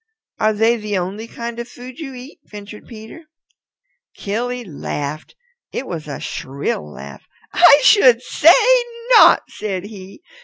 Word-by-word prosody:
"Are 215 0 +2
they 225 +3 +2
the 210 -2 -3
only 195 +5 -5
kind 235 0 -7
of 235 - -6
food 250 +2 -12
you 270 -5 -8
eat?" 255 +4 -12
ventured 205 0 -12
Peter. 225 +8 -12 0.9
Killy 245 +4 -4
laughed. 150 -4 -6 0.4
It - - -5
was 160 -7 -7
a 145 - -6
shrill 130 - -5
laugh. 70 -1 -11 0.3
"I 285 - +7
should 255 - +5
say 325 +6 +5 0.6
not," - - +7
said 195 -4 -5
he. 200 - -12
215 Hz, 140 wpm, -18 LUFS, 185-245 Hz, 0.9 s, I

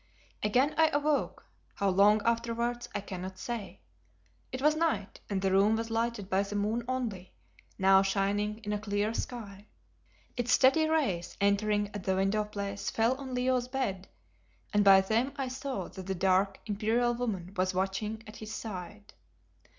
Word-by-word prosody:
Again 250 +8 +2
I 320 - +7
awoke, 295 -1 0 0.3
how 200 - +1
long 205 +3 +4
afterwards 235 +1 -1
I - - -1
cannot 185 -1 -7
say. 210 - -6 0.7
It 255 - -4
was 300 +3 +3
night, 310 -12 -1
and 195 -2 -1
the 190 - +2
room 200 +3 +4
was 225 0 -3
lighted 225 -3 -1
by 190 0 +2
the 200 +1 -4
moon 215 +4 0
only, 230 -8 -4 0.4
now 190 0 +6
shining 205 +2 0
in 210 -1 -2
a 210 - -1
clear 205 +1 -1
sky. 210 -5 -6 0.7
Its 245 0 +1
steady 315 +4 +5
rays 255 - 0
entering 205 +1 +1
at 205 -2 -5
the 190 - +1
window 195 +3 +1
place 200 -1 -4
fell 230 +3 +2
on 265 -2 -6
Leo's 250 0 +1
bed, 235 -8 -3 0.7
and 205 0 +4
by 195 -1 +8
them 230 +7 0
I 270 -2 -3
saw 265 +1 -4
that 190 -1 -9
the 190 - -1
dark, 190 +1 +2
imperial 225 +3 +1
woman 200 -7 -3
was 185 0 0
watching 210 +4 -2
at 215 - -11
his 215 0 -8
side. 205 0 -7
210 Hz, 165 wpm, -30 LUFS, 195-240 Hz, 0.7 s, by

